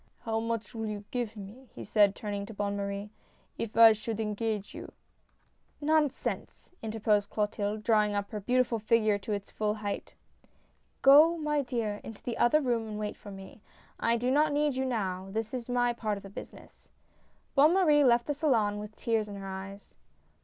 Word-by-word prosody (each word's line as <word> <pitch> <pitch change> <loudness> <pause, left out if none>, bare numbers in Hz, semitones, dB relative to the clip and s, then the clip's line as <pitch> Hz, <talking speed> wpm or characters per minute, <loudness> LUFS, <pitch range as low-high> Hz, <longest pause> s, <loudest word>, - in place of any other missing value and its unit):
" - - -41
How 225 -1 0
much 225 -3 -3
will 225 -1 -4
you 210 -1 -5
give 235 -3 -3
me," 215 +6 -11
he - - -7
said, 205 -2 +3
turning 205 -1 -4
to 225 - -10
Bonne 205 0 -2
Marie, 200 +1 -4 0.2
" - - -37
if 225 -1 -4
I 225 -1 +9
should 215 +1 -5
engage 210 -1 -2
you? - - -9 0.3
" - - -41
" - - -40
Nonsense! 300 -4 -1
" - - -39
interposed 215 -2 0
Clotilde, 210 0 -2
drawing 210 -2 +3
up 200 0 -3
her 210 - -4
beautiful 245 +2 +1
figure 215 -1 +2
to 200 - -6
its 200 -1 -5
full 210 -1 -1
height. 205 -2 -5 0.4
" - - -40
Go, 305 +5 +7
my 300 -2 0
dear, 230 -6 -3
into 225 - -10
the 240 - -4
other 305 +6 +4
room 235 -4 0
and 210 -1 -5
wait 210 -1 -3
for 205 - -12
me. 195 +2 -11 0.4
I 235 +1 +2
do 245 +2 0
not 300 +2 +3
need 290 -1 +1
you 265 0 -1
now, 190 -7 -2
this 220 +3 -3
is 250 -1 -5
my 245 -1 +2
part 215 -3 -2
of 200 - -11
the 195 - -10
business." - - -12 0.6
Bonne 300 +5 +5
Marie 305 -6 +5
left 240 -2 +4
the 295 - -1
salon 230 -9 +1
with 210 +1 -8
tears 225 -2 0
in 200 - -7
her 195 -1 -7
eyes. 195 +1 -8
220 Hz, 205 wpm, -29 LUFS, 205-245 Hz, 0.6 s, I